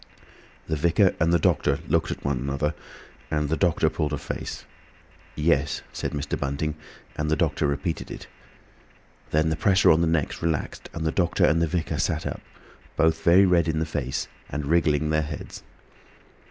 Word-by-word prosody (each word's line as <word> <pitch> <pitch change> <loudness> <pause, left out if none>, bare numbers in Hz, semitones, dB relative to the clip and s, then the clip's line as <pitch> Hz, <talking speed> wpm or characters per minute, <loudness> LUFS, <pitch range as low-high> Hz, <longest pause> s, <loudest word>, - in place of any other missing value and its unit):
The 80 - 0
vicar 85 +5 +3
and 80 +2 +3
the 85 - +5
doctor 75 - +2
looked - - +1
at - - -6
one 70 -2 0
another, 70 +3 -1 0.6
and 75 -1 0
the 80 - +1
doctor 85 -2 +2
pulled 75 0 -1
a - - 0
face. - - -6 0.7
"Yes," 75 -2 +1
said - - -3
Mr. 75 0 -3
Bunting, 70 +2 -2 0.4
and 75 0 -2
the 80 - +3
doctor 80 -2 +1
repeated 70 +4 -2
it. - - -8 1.0
Then 80 +1 +2
the 80 - 0
pressure 95 +4 +4
on 80 - +4
the 85 - +2
necks 80 -3 -1
relaxed, 80 -3 -2
and 80 -1 -3
the 80 - +1
doctor 85 -1 +2
and 85 +1 +3
the 85 - +2
vicar 85 0 -2
sat - - -1
up, - - -4 0.6
both 80 0 +3
very 90 +3 +6
red 85 -3 +3
in 80 -1 0
the 80 - 0
face 70 -5 -3 0.2
and 75 -1 -3
wriggling 80 -1 +2
their 75 0 +2
heads. 75 0 -7
80 Hz, 180 wpm, -25 LUFS, 75-85 Hz, 1.0 s, very